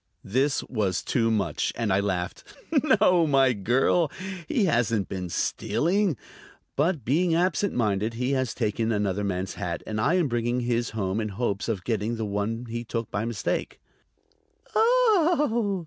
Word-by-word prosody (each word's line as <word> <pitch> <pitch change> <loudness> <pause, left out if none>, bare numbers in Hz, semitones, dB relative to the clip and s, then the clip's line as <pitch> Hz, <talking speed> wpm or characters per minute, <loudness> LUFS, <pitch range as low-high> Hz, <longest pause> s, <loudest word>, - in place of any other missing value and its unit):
This 135 +7 +1
was 100 -8 -1
too 115 -3 +1
much, 105 -3 0
and 115 -5 0
I 95 - +3
laughed. 95 -3 -2 0.6
"No, 180 -5 +4
my 135 -3 +4
girl; 125 - +2 0.4
he 220 - +1
hasn't 115 - +1
been 90 -2 -4
stealing. 175 - 0 0.6
But, 150 - 0
being 165 +6 +2
absent 185 +3 +1
minded, 110 -1 0
he 125 +3 -1
has 130 -3 -1
taken 110 0 -1
another 105 -2 0
man's 95 -1 -2
hat, 85 -2 -3
and 110 0 -2
I 170 - +2
am 175 -4 +2
bringing 120 0 -1
his 120 -1 0
home 100 +1 -1
in 110 - -3
hopes 100 0 -2
of 100 -5 -2
getting 110 0 -1
the 110 -1 -3
one 105 +4 -2
he 120 0 -5
took 115 -1 -4
by 100 +2 -1
mistake." 115 -3 -3 0.9
"Oh!" 340 - +3
115 Hz, 155 wpm, -26 LUFS, 105-155 Hz, 0.9 s, No